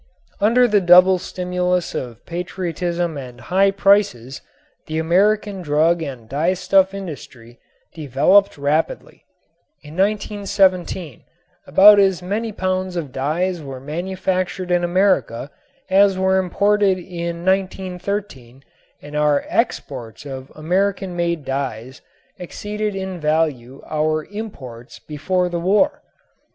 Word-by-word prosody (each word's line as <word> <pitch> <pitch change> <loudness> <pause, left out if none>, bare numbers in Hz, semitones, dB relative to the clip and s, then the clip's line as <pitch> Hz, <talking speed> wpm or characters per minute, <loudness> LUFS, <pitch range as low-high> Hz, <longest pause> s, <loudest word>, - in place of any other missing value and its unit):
Under 240 +4 +4
the 210 -3 +3
double 180 +1 +6
stimulus 180 0 -2
of 120 -2 -6
patriotism 175 -1 -3
and 125 -2 -10
high 190 +8 +2
prices 195 - +1 0.5
the 155 - -3
American 195 +4 +1
drug 160 +2 +2
and 130 -7 -7
dyestuff 185 - +2
industry 140 -10 -9 0.3
developed 160 +7 +2
rapidly. 145 +3 -2 0.6
In 150 0 -11
1917 195 - 0 0.5
about 205 +1 +7
as 190 -2 +2
many 215 +5 -2
pounds 185 -2 -2
of 155 -6 -4
dyes 165 +7 -1
were 135 -3 -8
manufactured 185 +4 -3
in 175 0 +2
America 175 - +1 0.4
as 195 0 +4
were 190 0 +2
imported 200 +1 +2
in 170 -1 -6
1913 185 - -3 0.4
and 145 +1 -9
our 150 -1 +2
exports 130 - -3
of 135 -1 -8
American 185 +3 -1
made 170 -4 -2
dyes 130 -2 -4 0.4
exceeded 210 +3 -4
in 190 -2 -5
value 150 -5 -1
our 155 0 -1
imports 135 - -8
before 180 +5 -2
the 175 -1 -3
war. 210 - +2
180 Hz, 110 wpm, -20 LUFS, 150-190 Hz, 0.6 s, about